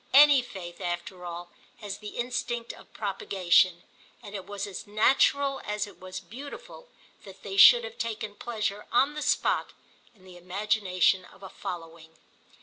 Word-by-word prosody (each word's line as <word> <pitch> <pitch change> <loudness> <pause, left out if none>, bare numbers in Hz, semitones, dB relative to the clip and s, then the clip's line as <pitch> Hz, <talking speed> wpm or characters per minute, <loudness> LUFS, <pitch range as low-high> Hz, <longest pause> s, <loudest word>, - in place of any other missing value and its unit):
Any 285 -1 +8
faith, 175 -7 -9
after 175 +1 -4
all, 175 0 -7 0.3
has 205 -3 -7
the 210 -1 -8
instinct 240 -1 -3
of - - -16
propagation, 185 -3 +2 0.4
and 205 -2 -10
it 195 -3 -6
was 205 0 -4
as 200 -1 -8
natural 275 +6 +3
as 210 0 -2
it 205 - -15
was 185 0 -7
beautiful 290 - -10 0.4
that - - -13
they - - -5
should 480 +4 +9
have 485 0 -8
taken 220 -2 -3
pleasure 210 -2 -4
on 275 +4 +3
the 300 - -5
spot - - +1 0.4
in 190 - -23
the 185 -1 -13
imagination 185 0 +1
of 195 - -18
a 190 - -8
following. 165 -3 -8
205 Hz, 155 wpm, -28 LUFS, 185-240 Hz, 0.4 s, should